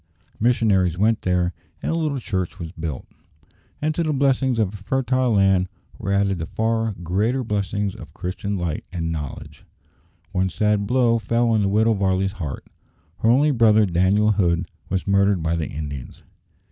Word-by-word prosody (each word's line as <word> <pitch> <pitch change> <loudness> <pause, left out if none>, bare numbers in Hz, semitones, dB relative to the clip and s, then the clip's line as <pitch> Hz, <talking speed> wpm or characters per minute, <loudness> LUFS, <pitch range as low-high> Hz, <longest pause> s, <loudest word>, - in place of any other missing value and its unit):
Missionaries 100 -7 +2
went 110 +3 +2
there, 90 -1 +1 0.3
and - - 0
a - - 0
little 155 -4 -1
church 95 -8 -3
was 85 -4 -6
built, 80 -6 -5 0.8
and 155 +1 +1
to 170 - -1
the 155 -2 0
blessings 135 -3 +2
of 105 -3 0
a - - -6
fertile 130 +3 0
land 95 -2 +3 0.3
were 100 - -3
added 100 -2 +1
the 80 - -4
far 110 +1 0
greater 105 +10 0
blessings 100 -2 -1
of - - -11
Christian 100 +3 -4
light 85 -4 -3
and 85 -2 -2
knowledge. 75 -4 -6 0.7
One 95 -1 +1
sad 105 +2 +1
blow 120 -1 +3
fell 115 +3 +1
on 110 -2 +3
the 100 - +2
Widow 110 +3 +3
Varley's 95 -1 +1
heart. 75 -4 -5 0.5
Her 110 - +2
only 140 +5 +4
brother, 110 -4 +5
Daniel 95 +4 +3
Hood, 90 -5 +1 0.2
was 95 0 -1
murdered 100 -3 +2
by 80 +1 0
the 80 -2 -2
Indians. 70 -3 -7
100 Hz, 170 wpm, -22 LUFS, 90-115 Hz, 0.8 s, brother